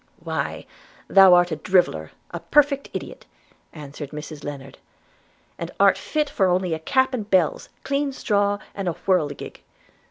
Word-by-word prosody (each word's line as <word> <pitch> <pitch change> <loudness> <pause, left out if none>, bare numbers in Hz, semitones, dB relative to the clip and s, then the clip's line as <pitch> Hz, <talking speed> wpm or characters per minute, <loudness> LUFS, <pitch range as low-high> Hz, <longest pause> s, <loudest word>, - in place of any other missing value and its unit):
'Why, - - -4 0.4
thou 190 -2 +7
art 175 0 +3
a 155 - -2
driveller, 145 - +1 0.2
a 170 - -5
perfect 280 - +2
idiot,' - - -7 0.4
answered 145 -2 -9
Mrs 150 0 -8
Lennard, 135 -2 -8 0.8
'and - - -4
art - - +6
fit 300 -5 -3
only 185 -1 +2
for - - +1
a - - -7
cap 260 +11 +1
and 215 -5 -4
bells, 185 -6 +1
clean 280 0 -1
straw, 205 -5 0 0.2
and 195 -2 -5
a 175 - 0
whirligig. 155 -7 -1
180 Hz, 150 wpm, -23 LUFS, 150-215 Hz, 0.8 s, thou